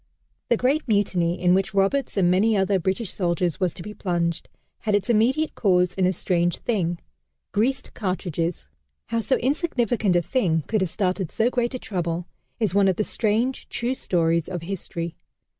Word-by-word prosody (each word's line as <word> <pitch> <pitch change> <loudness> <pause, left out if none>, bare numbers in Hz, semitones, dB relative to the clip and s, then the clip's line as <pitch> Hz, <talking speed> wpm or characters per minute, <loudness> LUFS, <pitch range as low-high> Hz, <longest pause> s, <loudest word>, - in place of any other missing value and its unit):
The 235 - +4
great 275 +6 +1
Mutiny, 185 -5 +1
in 180 0 +4
which 190 0 +1
Roberts 200 +7 +1
and 180 -2 +4
many 210 +4 +3
another 195 0 +2
British 190 +4 -2
soldier 175 -1 +1
was 185 -2 +1
to 170 - -8
be 210 - -7
plunged, 170 -4 -2 0.3
had 210 -2 +1
its 205 +3 +1
immediate 255 +8 +2
cause 180 -4 +2
in 185 -1 +2
a - - +3
strange 175 -1 0
thing 175 -7 -1 0.5
greased 245 +6 0
cartridges! 180 -4 -2 0.4
How 230 - 0
so 260 +4 +1
insignificant 245 - +1
a 175 - +3
thing 170 - +1
could 215 -2 0
have 190 - +1
started 185 -1 -1
so 230 +2 +1
great 245 0 0
a - - -1
trouble 175 -6 -3 0.3
is 215 -6 +1
one 200 -1 +4
of 190 - +3
the 215 - 0
strange, 225 +5 -1
true 240 +2 -1
stories 170 -8 0
of 175 -3 -4
history. 170 -2 -5
195 Hz, 175 wpm, -24 LUFS, 175-225 Hz, 0.5 s, The